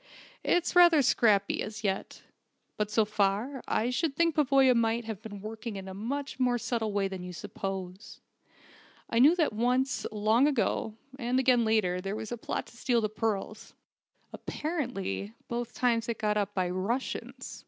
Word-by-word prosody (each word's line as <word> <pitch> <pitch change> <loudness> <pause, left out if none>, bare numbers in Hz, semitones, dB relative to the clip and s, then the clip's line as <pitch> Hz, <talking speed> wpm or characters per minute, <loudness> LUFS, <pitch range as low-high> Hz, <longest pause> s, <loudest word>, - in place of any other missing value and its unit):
"It's 350 0 +1
rather 345 -4 +7
scrappy 205 -5 +3
as 215 0 -6
yet. 195 -2 -3 0.5
But 210 -1 -1
so 215 0 +3
far, 210 +6 0
I 235 +3 +1
should 275 +3 -1
think 335 +1 +2
Pavoya 270 -3 +4
might 230 0 +1
have 220 -3 -6
been 205 -3 -8
working 220 +1 -6
in 195 -1 -7
a 190 - -6
much 260 +7 -4
more 250 -1 +2
subtle 230 -2 -2
way 200 -1 +1
than 190 -1 -6
you 180 0 -7
suppose. 190 +2 -6 0.9
I 230 - +2
knew 295 +7 +7
that 320 -9 +1
once, 250 +3 0
long 215 +5 +3
ago, 230 -5 0 0.2
and 250 +1 +1
again 250 -2 +4
later, 195 -5 +1
there 195 +2 -3
was 220 0 -6
a 240 - -3
plot - - -3
to 235 - -17
steal 240 -1 +1
the 215 - 0
pearls. 215 0 -3 0.6
Apparently 195 - -4
both 240 0 -4
times 235 -2 +1
it 230 - -2
was - - -13
got 210 -1 +1
up 205 -1 -1
by 185 -2 +1
Russians. 195 +9 -3
225 Hz, 175 wpm, -29 LUFS, 205-250 Hz, 0.9 s, rather